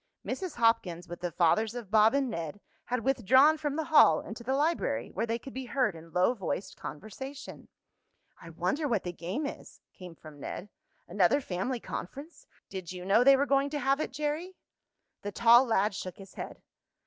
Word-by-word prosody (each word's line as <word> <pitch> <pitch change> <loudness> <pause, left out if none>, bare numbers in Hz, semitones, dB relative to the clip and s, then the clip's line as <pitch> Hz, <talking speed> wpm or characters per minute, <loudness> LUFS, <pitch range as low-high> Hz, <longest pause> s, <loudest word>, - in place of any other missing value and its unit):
Mrs. 370 -4 -4
Hopkins, 180 -7 +1
with 175 0 -8
the 175 -1 -2
fathers 215 +8 +2
of 230 -5 -7
Bob 220 +3 +5
and 280 -1 +1
Ned, 170 -5 -5 0.3
had 250 -2 -2
withdrawn 270 +4 +5
from 295 -2 -3
the 320 - -1
hall 295 - +6
into 230 +2 -8
the 260 +3 0
library, 290 - 0
where 225 +5 -2
they 230 +1 0
could 265 +3 -11
be 265 0 -5
heard 250 -8 0
in 165 0 -13
low 180 +7 +3
voiced 195 -3 -4
conversation. 265 - -8 0.7
"I 170 - -10
wonder 180 - -1
what 230 -7 0
the 175 - -3
game 185 - -4
is," 280 - -8
came 180 -3 -11
from 155 -2 -13
Ned. 195 +7 -6 0.4
"Another 185 +8 +3
family 240 +2 -3
conference! 280 - -8 0.2
Did 185 -3 -7
you 180 -1 -7
know 205 +5 +4
they 275 +1 +7
were 280 - +2
going 275 0 +2
to 295 0 -3
have 275 +1 +1
it, 310 - -2
Jerry?" 300 +6 -3 0.7
The 205 - -5
tall 235 +4 +6
lad 215 -3 +1
shook 185 -2 -6
his 195 -1 -13
head. - - -8
230 Hz, 190 wpm, -29 LUFS, 180-275 Hz, 0.7 s, they